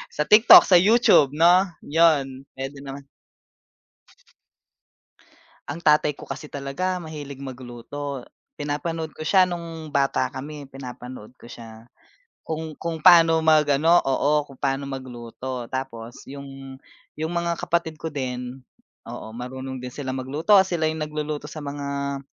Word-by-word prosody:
sa 150 - +1
TikTok, 215 +2 +9
sa 180 -2 +7
YouTube, 200 - +5
'no? 175 +4 +5 0.2
'Yon, 145 -4 +2
pwede 135 +1 -6
naman. 140 0 -9 2.6
Ang 165 +4 -6
tatay 150 -1 +3
ko - - -13
kasi 150 - -6
talaga 150 +7 -3
mahilig 145 -3 -8
magluto. 130 +2 -7 0.3
Pinapanood 155 +2 -4
ko 155 - -8
siya 190 +1 +5
nung 165 -3 -7
bata 140 -1 +1
kami, 145 +2 -8
pinapanood 125 -3 -10
ko 120 - -15
siya. 115 0 -12 0.5
Kung 160 0 -5
kung 165 -2 -4
paano 165 -2 +7
mag-ano 155 +2 +4
oo. 145 +2 +1
Kung 135 - -14
pa'no 135 0 -2
magluto 125 -1 -7
tapos 120 -3 -6
yung 135 -1 -10 0.4
yung 160 +2 -3
mga 170 -1 -1
kapatid 165 -2 -2
ko 160 - -3
din, 125 -2 -5 0.4
oo, - - -8
marunong 130 +2 -6
din 125 0 -8
sila 130 -2 -5
magluto. 145 +10 +2
Sila 170 -4 -1
yung 155 -1 -3
nagluluto 150 -1 -4
sa 155 - -8
mga 140 -1 -4
145 Hz, 130 wpm, -23 LUFS, 130-160 Hz, 2.6 s, TikTok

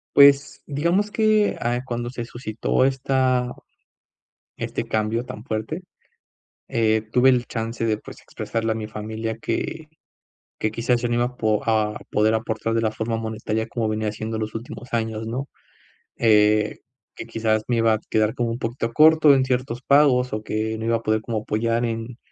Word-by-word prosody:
Pues, 140 0 +6
digamos 170 +8 +1
que, 215 -1 +2
ah, 120 +1 0
cuando 120 -1 -3
se 120 -1 -5
suscitó 115 0 -1
esta 130 -2 +1 1.1
este - - -3
cambio 110 +2 0
tan 110 -3 -8
fuerte. 110 +8 -3 0.9
Eh, 110 -1 +1
tuve 125 +2 +5
el 125 -2 +2
chance 115 0 -3
de, 110 -1 +1
pues, - - -12
expresarle 115 0 -3
a - - -7
mi 110 -1 -4
familia 110 +1 -5
que 160 +6 -3 0.7
que 110 - -1
quizás, 120 +2 0
yo 120 - -1
no 120 - +1
iba 120 - +2
a 125 0 -6
po 110 -3 +1
a 110 -1 +1
poder 110 +1 +2
aportar 110 0 -1
de 115 - +2
la 110 - +2
forma 110 +1 -2
monetaria 110 0 -3
como 115 -1 -2
venía 110 0 -1
siendo 110 +1 -4
en - - -3
los 110 +1 -4
últimos 120 +2 -7
años, 110 -1 -2
¿no?, 130 +5 -3 0.7
Eh, 105 -1 +3 0.4
que, - - -6
quizás, 110 -1 0
me 120 - +1
iba 115 -1 +4
a - - -1
quedar 110 0 +2
como 120 -1 -1
un 115 - -3
poquito 115 -1 -3
corto 155 0 +6
en 135 -1 +3
ciertos 125 -1 -1
pagos, 135 -3 +4
o 110 - -3
que 110 +1 -2
no 110 - -5
iba 115 0 +2
a 115 - -5
poder 110 -1 +1
como 115 -1 -2
apoyar 115 +2 0
en, 115 +1 -5
115 Hz, 185 wpm, -23 LUFS, 110-125 Hz, 1.1 s, Pues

